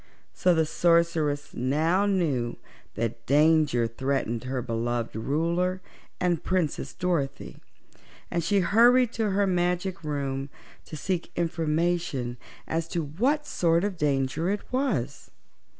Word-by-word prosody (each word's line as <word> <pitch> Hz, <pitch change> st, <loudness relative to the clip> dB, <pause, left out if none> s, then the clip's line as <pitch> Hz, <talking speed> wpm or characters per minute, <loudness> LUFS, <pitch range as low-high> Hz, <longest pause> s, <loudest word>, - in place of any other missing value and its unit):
So 180 Hz, -1 st, +3 dB
the 160 Hz, -1 st, +3 dB
Sorceress 165 Hz, -3 st, +1 dB
now 160 Hz, +10 st, +1 dB
knew 145 Hz, -12 st, 0 dB, 0.4 s
that 115 Hz, +1 st, -3 dB
danger 150 Hz, -3 st, +4 dB
threatened 120 Hz, -1 st, -2 dB
her 130 Hz, 0 st, -2 dB
beloved 115 Hz, 0 st, -2 dB
Ruler 170 Hz, +9 st, 0 dB, 0.4 s
and 175 Hz, -3 st, 0 dB
Princess 180 Hz, -5 st, -1 dB
Dorothy, 170 Hz, -7 st, -2 dB, 0.7 s
and 170 Hz, -1 st, 0 dB
she 195 Hz, +4 st, +2 dB
hurried 240 Hz, +6 st, +5 dB
to 220 Hz, -2 st, 0 dB
her 200 Hz, +1 st, +2 dB
magic 180 Hz, 0 st, 0 dB
room 140 Hz, -2 st, -3 dB, 0.4 s
to 155 Hz, -, -8 dB
seek 180 Hz, +3 st, -3 dB
information 165 Hz, -6 st, -1 dB, 0.3 s
as 165 Hz, 0 st, -1 dB
to 165 Hz, 0 st, -2 dB
what 250 Hz, -, 0 dB
sort 170 Hz, -, +1 dB
of 205 Hz, -2 st, -1 dB
danger 145 Hz, +2 st, 0 dB
it 205 Hz, +1 st, -1 dB
was. 215 Hz, -, -1 dB
165 Hz, 120 wpm, -27 LUFS, 135-180 Hz, 0.7 s, hurried